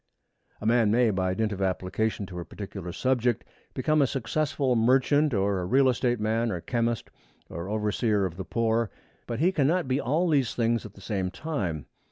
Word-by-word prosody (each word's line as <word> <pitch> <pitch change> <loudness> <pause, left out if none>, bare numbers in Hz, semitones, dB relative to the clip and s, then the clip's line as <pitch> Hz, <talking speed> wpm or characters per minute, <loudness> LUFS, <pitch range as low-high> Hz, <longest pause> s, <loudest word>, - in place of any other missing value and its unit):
A - - -8
man 115 -1 +4
may, 115 +1 +4
by 95 -1 0
dint 110 +1 0
of 100 -1 -4
application 95 +3 -1
to 90 -1 -7
a - - -4
particular 95 -2 -7
subject, 125 +1 +1 0.3
become 155 +3 +2
a 140 - +4
successful 135 +1 0
merchant 135 +6 +3
or 100 -3 +1
real 135 +6 +4
estate 125 -1 +1
man 110 +2 0
or 90 - -2
chemist 115 +4 -2 0.4
or 85 +3 -5
overseer 105 -1 +1
of 90 -3 -4
the 95 - -5
poor. 115 +2 0 0.4
But 115 +2 -3
he 180 +3 +4
cannot 165 0 +1
be 130 +2 +1
all 155 +8 +1
these 140 -8 +1
things 115 -1 0
at 105 - -18
the 100 - -14
same 95 -3 -2
time. 95 - -3
115 Hz, 185 wpm, -27 LUFS, 100-130 Hz, 0.4 s, man